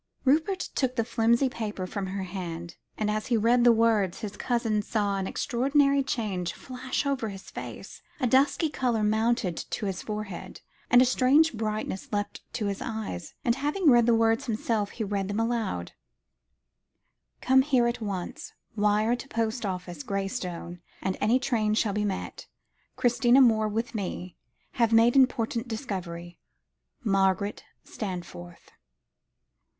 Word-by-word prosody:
Rupert 320 +8 +2
took 255 -2 0
the 230 - +1
flimsy 235 +3 +2
paper 215 -6 -4
from 195 +1 -4
her 190 +1 -3
hand, 170 -2 -6 0.2
and 210 -1 0
as 215 0 -2
he 240 -3 +2
read 235 +3 +3
the 240 - +7
words, 220 -5 +2
his 210 -3 -5
cousin 230 -4 0
saw 205 -1 -1
an 190 -1 -2
extraordinary 275 +5 +2
change 200 -10 -2
flash 255 +2 -4
over 270 -6 -1
his 195 -1 -10
face - - -8 0.2
a 260 - +1
dusky 270 +6 +3
colour 245 -7 0
mounted 220 -3 +1
to 215 - -4
his 190 -2 -3
forehead, 210 -4 -6 0.3
a 245 +1 +7
strange 265 +5 +4
brightness 215 -3 -3
leapt 205 -1 -3
to 220 - -2
his 200 -1 -2
eyes; 220 - -5
and, 235 - +4
having 295 +3 +2
read 240 -1 +5
the 235 - +5
words 225 +4 +2
to 235 - -1
himself, 215 -1 -1
he 225 - -5
read 200 -2 -2
them 205 +2 -2
aloud 225 - -1 1.5
"Come 265 +1 +5
here 260 -3 +2
at 235 0 -1
once. 195 -4 -5 0.2
Wire 210 +2 +2
to 245 - -9
post 225 -2 -1
office, 180 -4 -5
Graystone; 180 - -4 0.2
and 190 0 0
any 225 +4 +4
train 225 -5 0
shall 215 -2 +1
be 210 +1 0
met. 195 -2 -4 0.5
Christina 245 +1 +4
Moore 220 -4 +5
with 225 +5 -2
me. 185 -4 -4 0.4
Have 230 -2 +1
made 230 +2 +5
important 245 -2 +2
discovery. 180 -7 -5 0.6
MARGARET 195 -1 +1 0.2
STANFORTH." 175 - -7
220 Hz, 150 wpm, -27 LUFS, 195-245 Hz, 1.5 s, the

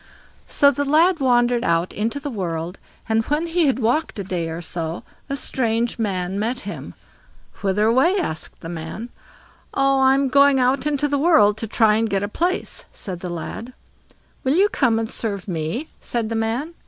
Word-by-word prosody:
So 280 0 +5
the 285 +1 -1
lad 320 +5 +3
wandered 245 -2 +3
out 170 +1 +1
into 225 +6 -2
the 285 0 -5
world, 175 -4 -4 0.3
and 225 0 +2
when 300 +3 0
he 335 -1 +2
had 265 - +2
walked 260 +6 0
a 200 - -3
day 175 -3 -3
or 160 +1 -5
so, 170 -1 -4 0.3
a 275 - -2
strange 235 -3 0
man 190 -3 -1
met 240 +4 -1
him. 205 - -7 0.7
"Whither 200 +2 +1
away?" 260 - +4
asked 160 - -4
the - - -7
man. 170 +8 -6 0.7
"Oh, 275 0 +3
I'm 270 +1 +4
going 280 0 +5
out 260 +3 +2
into 295 -1 +1
the 285 -1 0
world 245 -11 +5
to 225 - -4
try 215 -1 +3
and 225 0 0
get 195 -1 0
a - - -1
place", 350 - -2
said 185 -4 -7
the 180 - -5
lad. 220 +8 -6 0.7
"Will 265 +3 +2
you 400 +4 +4
come 240 - +2
and 225 0 -1
serve 205 -4 -3
me?" 175 - -3
said 230 -2 -2
the 225 - -2
man. 230 +9 -2
230 Hz, 185 wpm, -22 LUFS, 200-275 Hz, 0.7 s, So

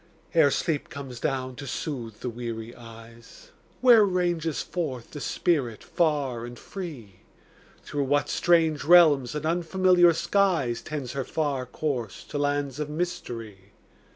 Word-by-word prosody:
Ere 160 -4 +5
sleep 150 +1 -1
comes 135 -4 -8
down 130 -1 -2
to 140 +2 -8
soothe 120 -5 -5
the 125 - -3
weary 115 -1 -6
eyes, 115 - -14 0.3
Where 240 -4 +7
ranges 175 -5 0
forth 135 -9 -4
the 145 - -7
spirit 135 -12 0
far 145 -8 0
and 120 0 -8
free? 130 - -8 0.6
Through 145 -1 -2
what 145 +2 +1
strange 165 -4 +2
realms 150 -7 +6
and 150 0 -3
unfamiliar 175 +1 +4
skies. 165 -9 +1
Tends 140 -5 -5
her 135 -1 -3
far 140 -3 -2
course 125 -7 -3
to 145 - -3
lands 145 -1 -1
of 150 -1 -3
mystery? 115 - -5
145 Hz, 135 wpm, -26 LUFS, 120-170 Hz, 0.6 s, Where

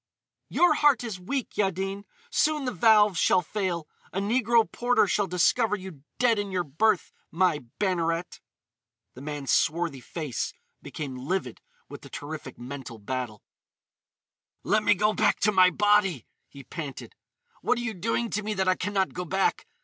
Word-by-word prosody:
"Your 355 - +4
heart 285 -5 +3
is 220 -6 -5
weak, 255 +8 -4
Yaddin. 195 0 -1 0.3
Soon 305 - +1
the 250 - -1
valves 210 -7 +4
shall 180 - +4
fail. 175 -3 -3 0.2
A 195 - -2
negro 230 +2 +3
porter 245 -2 +2
shall 200 0 0
discover 205 +5 +2
you 185 -7 -9 0.2
dead 235 -4 +3
in 205 -1 -3
your 180 -1 0
berth, 185 +7 +1 0.2
my 175 -2 +2 0.2
Banneret!" 170 -3 -1 0.7
The 130 - -11
man's 145 -1 -4
swarthy 165 -3 +1
face 150 0 -4 0.3
became 140 -4 -6
livid 130 -1 -3 0.3
with - - -10
the - - -12
terrific 145 -2 -7
mental 125 -1 -8
battle. 110 -1 -5 1.2
"Let 215 +3 +2
me 205 - +4
go 210 +3 +2
back 210 -1 +2
to 210 - +4
my 185 -2 +6
body!" 200 - +2 0.2
he 140 -1 -12
panted. 145 -2 -7 0.5
"What 250 - +1
are - - -2
you 240 -2 -3
doing 225 +4 -1
to 210 - -1
me 210 0 -3
that 190 -1 0
I 185 - +5
can 205 +2 -4
not 190 -1 +1
go 180 - -4
back? 190 +3 0
190 Hz, 165 wpm, -27 LUFS, 155-210 Hz, 1.2 s, my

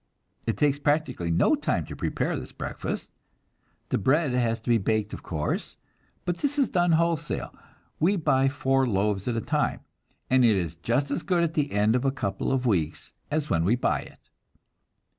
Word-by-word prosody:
It 115 - 0
takes 145 -1 +2
practically 145 - 0
no 85 +1 +3
time - - 0
to - - -8
prepare - - -1
this - - -6
breakfast. - - -5 0.8
The - - +1
bread 145 - +2
has 120 -2 +1
to 115 - -6
be 115 - +4
baked, 110 +1 0
of - - -6
course, 75 -3 -3 0.5
but 175 -1 -1
this 290 0 0
is 275 -4 +3
done 175 -2 +2
wholesale; 165 -2 0 0.5
we 180 +6 +3
buy 135 -6 +2
four 135 -1 +1
loaves 100 -1 0
at 120 -2 0
a - - 0
time, - - 0 0.5
and 130 0 +4
it 115 -3 +5
is 85 -4 -2
just 120 - -1
as - - -1
good 175 -3 +1
at 165 -1 0
the 145 -3 0
end 105 +3 +3
of 125 - +1
a 135 - +3
couple 100 -8 -2
of 130 -1 0
weeks 85 -10 -1 0.2
as 150 0 -1
when 80 -2 +2
we 100 +8 +3
buy 125 - +1
it. - - -13
130 Hz, 190 wpm, -26 LUFS, 105-150 Hz, 0.8 s, it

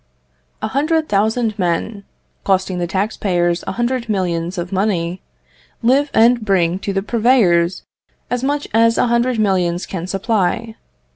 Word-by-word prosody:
A - - -1
hundred 310 +3 0
thousand 220 +1 0
men, 195 +4 -2 0.4
costing 190 -2 0
the 175 - -1
tax 195 +4 -2
payers 175 -3 0
a - - -2
hundred 240 +1 -2
millions 180 -3 -1
of 175 0 -4
money, 185 -3 -1 0.6
live 275 +5 +3
and 235 +1 +4
bring 185 -3 +1
to 200 - -3
the 195 0 -1
purveyors 210 -7 +2 0.4
as 245 0 -2
much 290 +1 -1
as 230 +1 +4
a - - +3
hundred 235 +1 +1
millions 185 -4 0
can 180 -2 -5
supply. 215 +3 -1
200 Hz, 145 wpm, -18 LUFS, 180-235 Hz, 0.6 s, and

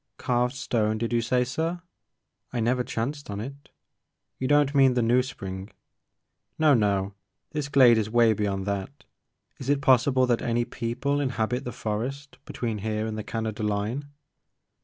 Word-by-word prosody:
"Carved 125 +1 0
stone 110 -4 0
did 115 +1 -2
you 120 - +3
say 125 +2 +2
sir? 160 +7 -2 0.7
I 125 - -2
never 125 +2 +1
chanced 140 +5 -4
on 100 0 -4
it. 140 +6 -8 0.7
You 130 - -1
don't 145 0 +3
mean 135 -3 +5
the 120 - +2
New! 120 +2 +4
Spring 95 -6 -6 0.5
" - - -53
No, 155 -2 +5
no! 100 -4 +1 0.4
This 150 -2 -3
glade 125 -5 +6
is 110 -1 -2
way 115 -1 +4
beyond 100 -2 -2
that. 100 +7 -4 0.6
Is 135 - -5
I - - +6
it 140 - -3
possible 130 0 +4
that 120 -2 +1
any 120 0 0
people 125 +6 -2
inhabit 125 -2 -1
the 125 - -3
forest 130 +7 -4
be - - -9
tween 115 -3 -2
here 110 +1 -2
and 110 -1 -3
the 110 - -4
Canada 110 -1 -4
line 105 +7 -2
120 Hz, 175 wpm, -26 LUFS, 110-135 Hz, 0.7 s, glade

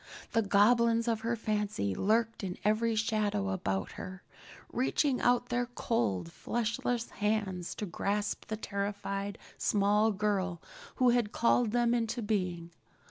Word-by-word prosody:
The 225 - +3
goblins 230 +3 +4
of 225 -2 0
her 230 +1 0
fancy 210 - -1
lurked 225 - +1
in 180 -2 -4
every 220 +2 +2
shadow 210 -2 0
about 95 - -2
her, 185 0 -8 0.5
reaching 260 +1 +1
out 245 0 +2
their 245 0 0
cold, 100 - -1
fleshless 235 +1 -2
hands 205 -4 -1
to 210 - -3
grasp 205 +3 -2
the 215 - -3
terrified 200 -1 -3 0.2
small 210 +2 +3
girl 190 -3 -1 0.4
who 255 -2 +4
had 235 -3 +1
called 235 0 +3
them 240 +1 +2
into 235 0 -1
being. 180 -5 -2
210 Hz, 135 wpm, -31 LUFS, 200-230 Hz, 0.5 s, goblins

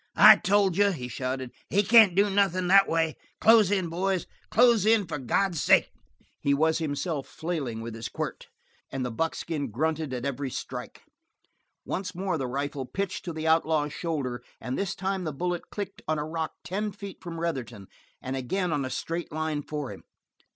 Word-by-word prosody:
"I - - +10
told 195 -3 +2
you," 205 0 +5
he 135 -10 -4
shouted. 130 +1 -4 0.2
"He 200 +2 +3
can't 215 -3 +7
do 200 +2 +4
nothin' 195 -2 +2
that 195 +1 +6
way. 160 -1 +1 0.2
Close 220 -3 +6
in, 190 -3 +1
boys. 185 +2 -1 0.2
Close 235 -3 +5
in 215 -1 +4
for 160 -3 -4
God's 170 +6 0
sake!" - - +4 0.5
He 140 0 +2
himself 160 -1 0
was - - -20
flailing 145 -9 -3
with 115 0 -6
his 115 0 -6
quirt, - - -5 0.4
and 135 -1 -2
the 125 - -3
buckskin 160 +1 -2
grunted 155 +5 -1
at 125 0 -4
every 140 0 -2
strike. - - -7 0.8
Once 190 -1 -4
more 180 -3 -1
the 130 - -2
rifle 140 +1 -3
pitched 195 +3 -3
to 175 - -3
the 160 0 -5
outlaw's 160 -2 +2
shoulder, 140 -8 -3 0.2
and 125 +3 -4
this 195 -2 -2
time 190 0 -2
the 155 - -2
bullet 175 +4 -3
clicked 200 -1 -6
on 155 0 +1
a 150 - -2
rock 160 0 -3
not - - -57
ten 210 +3 -2
feet 200 0 -9
from 170 -2 -6
Retherton, 125 -11 -4 0.4
and 130 +1 -3
again 170 +7 -1
on 145 -2 0
a 130 - -3
straight 165 +6 -4
line 155 -1 -2
for 145 -2 -5
him. - - -13
160 Hz, 185 wpm, -27 LUFS, 140-190 Hz, 0.8 s, I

